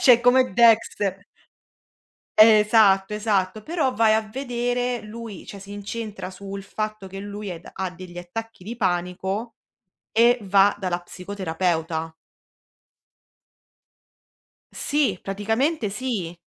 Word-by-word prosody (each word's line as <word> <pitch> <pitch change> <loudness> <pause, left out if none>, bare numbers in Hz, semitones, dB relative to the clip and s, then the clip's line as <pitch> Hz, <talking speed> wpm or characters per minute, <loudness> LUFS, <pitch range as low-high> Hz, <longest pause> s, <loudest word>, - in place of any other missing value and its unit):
cioè 245 -3 +7
come 250 -2 +4
Dexter. 205 -3 +3 1.1
Esatto, 210 -2 +6
esatto. 210 -1 0
Però 310 -4 0
vai 225 -2 +4
a 220 - +3
vedere, 245 +1 -2
lui 215 -2 -9
cioè, 200 - -9
si 195 +1 -11
incentra 205 -2 -6
sul 195 +1 -8
fatto 215 0 -5
che 195 +1 -8
lui 205 0 -6
è 170 -2 -6
ha 190 -1 -3
degli 180 -1 -11
attacchi 225 +3 -7
di 225 +5 -6
panico 190 +3 -2 0.6
e 235 +2 +5
va 200 0 +4
dalla 180 -2 -2
psicoterapeuta. 170 -3 -3 2.6
Sì, 280 -11 0
praticamente 220 +6 -1
sì. 200 -6 -3
205 Hz, 110 wpm, -24 LUFS, 190-230 Hz, 2.6 s, cioè